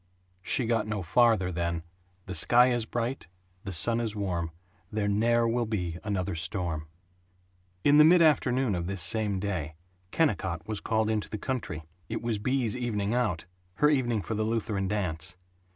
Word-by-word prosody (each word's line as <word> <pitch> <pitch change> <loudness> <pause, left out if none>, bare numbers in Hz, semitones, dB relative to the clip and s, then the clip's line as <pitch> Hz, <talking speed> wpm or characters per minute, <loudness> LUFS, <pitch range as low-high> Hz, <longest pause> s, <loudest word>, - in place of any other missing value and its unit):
(She 120 +6 +1
got 115 -2 0
no 105 -3 -3
farther 110 -1 +3
than 85 -1 -2 0.4
"The 95 - -6
sky 120 +9 +5
is 120 -2 0
bright, 120 -3 -3 0.4
the 95 - -4
sun 115 +8 +3
is 110 -3 -2
warm, 90 -5 -2 0.4
there 105 -1 -1
ne'er 115 +3 +2
will 120 0 0
be 90 -6 -3
another 100 -3 -2
storm.") 80 -2 -3 1.0
In 145 +1 +6
the - - +10
mid 175 +3 +6
afternoon 130 -7 +3
of 85 -1 -2
this 95 -3 -1
same 105 +1 +1
day 90 -6 -3 0.3
Kennicott 95 - 0
was 110 -2 -3
called 110 0 0
into 105 -1 -2
the 110 - -4
country. 105 - -4 0.3
It - - -4
was 115 -3 -1
Bea's 125 0 0
evening 110 -4 -2
out 110 -10 0 0.3
her 150 +8 +4
evening 120 -7 +1
for - - -4
the 110 - -1
Lutheran 110 -3 -1
Dance. 90 -4 -3
105 Hz, 170 wpm, -28 LUFS, 90-120 Hz, 1.0 s, the